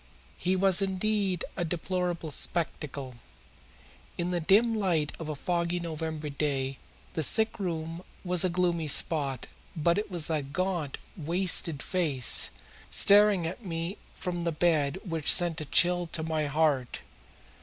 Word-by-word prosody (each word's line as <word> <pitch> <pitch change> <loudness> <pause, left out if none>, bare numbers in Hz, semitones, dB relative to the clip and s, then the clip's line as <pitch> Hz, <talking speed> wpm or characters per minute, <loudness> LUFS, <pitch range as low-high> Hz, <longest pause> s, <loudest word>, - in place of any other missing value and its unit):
He 185 +1 0
was 190 0 +4
indeed 195 -1 -1
a 175 - -2
deplorable 175 -1 -3
spectacle. 140 -5 -2 1.0
In 175 +1 -2
the 175 - 0
dim 210 +8 +3
light 175 -8 0
of 160 -2 -6
a 155 - -3
foggy 170 +3 -1
November 160 -2 -5
day 135 -2 -2 0.3
the 160 - -1
sick 220 +9 +3
room 165 -2 -4 0.2
was 180 -2 +4
a 185 - +2
gloomy 170 -2 0
spot, 140 -3 +2 0.3
but 170 +4 +1
it 210 - -5
was 175 -4 -2
that 145 -4 -3
gaunt, 180 -6 -2 0.2
wasted 170 -3 0
face 150 -9 +2 0.4
staring 205 -3 +5
at 180 +8 -6
me 170 +1 -5 0.2
from 175 -1 -4
the 170 - 0
bed 155 -1 +1
which 165 -4 +2
sent 175 -3 +2
a - - -5
chill 175 +3 +3
to 160 0 -3
my 155 -2 -1
heart. 145 -4 0
170 Hz, 145 wpm, -28 LUFS, 155-180 Hz, 1.0 s, staring